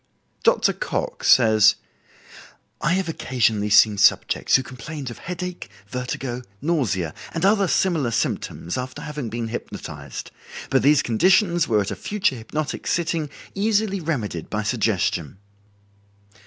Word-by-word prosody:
Dr. - - +3
Cocke - - -4
says: 110 -4 +6 1.1
"I 170 - +2
have 190 -1 0
occasionally 115 -9 0
seen 105 0 +5
subjects - - +3
who 130 - +3
complained 130 +2 -7
of - - -10
headache, 180 0 -6 0.2
vertigo, 125 +1 -4 0.2
nausea, 110 - 0 0.2
and 165 - 0
other 200 -1 +4
similar 165 -7 +1
symptoms 115 -3 -2
after 130 +3 -6
having 150 -6 -5
been 115 0 -4
hypnotized, 120 - -7 0.4
but 135 - +4
these 145 +1 +4
conditions 175 - +3
were 110 -3 +3
at 100 - -3
a - - -3
future 205 -6 0
hypnotic 140 +6 -4
sitting 165 -3 0 0.2
easily 205 -1 +1
remedied 120 - -3
by 105 0 -2
suggestion." 100 - 0
130 Hz, 130 wpm, -23 LUFS, 110-170 Hz, 1.1 s, says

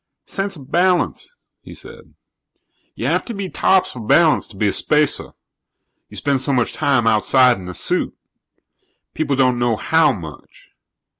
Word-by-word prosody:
"Sense 195 0 -3
of 140 -3 -14
balance," 180 - 0 0.2
he - - -12
said. - - -13 0.8
"You - - -5
have - - 0
to 235 - -6
be 195 -2 -5
tops 190 +1 +2
for 125 - -10
balance 155 +8 +3
to 105 - -16
be 105 - +1
a 100 - 0
spacer 150 -1 +1 0.8
you - - -7
spend 140 -2 0
so 135 - -1
much 125 -2 0
time 140 -6 +1
outside 120 +3 +3
in 90 -1 -9
a 90 - -8
suit. - - -1 1.0
People 150 -3 -1
don't 130 -2 +2
know 120 -2 +1
how 160 +6 +2
much. 85 - -11
135 Hz, 160 wpm, -19 LUFS, 115-165 Hz, 1.0 s, balance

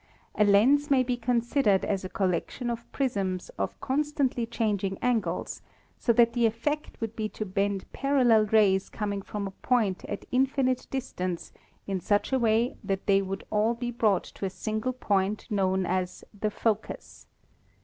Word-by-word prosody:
A 210 - +3
lens 245 +9 +4
may 265 -2 +4
be 250 0 -1
considered 235 -3 +2
as 195 -2 -1
a 185 - -5
collection 195 +7 -1
of 235 0 -7
prisms 195 -9 -1
of - - -4
constantly 275 -4 0
changing 205 -4 -1
angles, 220 -8 -1 0.4
so 235 - +2
that 235 0 +4
the 235 -1 +3
effect 295 +7 -3
would 225 -1 -4
be 215 -1 -2
to 215 - -5
bend 195 0 -1
parallel 250 -6 +3
rays 200 -3 +3
coming 205 -2 -3
from 205 +1 -5
a 195 - -4
point 210 -3 0
at 205 - -5
infinite 260 0 +1
distance 185 -9 -4 0.3
in 195 -1 -2
such 205 +7 0
a 265 - +3
way 230 +1 +2
that 195 -1 -2
they 195 -1 +4
would 195 0 -4
all 220 +2 +2
be 240 +1 -3
brought 215 -5 +2
to - - -11
a 195 - 0
single 215 +6 -3
point 205 -4 0
known 190 -2 +1
as 180 0 -2
the 210 +1 -1
focus. 215 0 -3
215 Hz, 165 wpm, -28 LUFS, 195-245 Hz, 0.4 s, lens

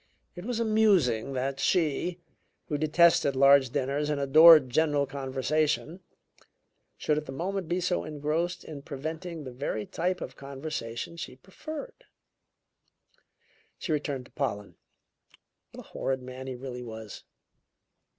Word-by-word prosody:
It 175 +1 -8
was 240 -1 -2
amusing 195 - +2
that 135 +1 -2
she, 170 +2 +1 0.5
who 150 - 0
detested 160 -1 +4
large 135 -1 +6
dinners 140 +4 -1
and 150 -1 0
adored 155 +1 +8
general 145 0 +2
conversation, 140 +5 -1 1.0
should 150 0 +1
at 150 - -11
the - - -5
moment 185 +5 -3
be 175 +2 0
so 180 0 0
engrossed 155 +3 -2
in 150 -3 -8
preventing 160 +4 -6
the 130 - -7
very 120 -4 -3
type 180 +2 -2
of 125 - -7
conversation 140 0 -6
she 145 -6 -7
preferred. 315 - -9 1.7
She 170 - -4
returned 145 -4 -2
to - - -19
Pollen. 105 -8 -3 1.0
What - - -11
a - - -20
horrid 130 -1 -2
man 130 +1 -8
he 130 - -4
really 125 -1 -7
was! 110 -3 -9
145 Hz, 130 wpm, -28 LUFS, 130-170 Hz, 1.7 s, adored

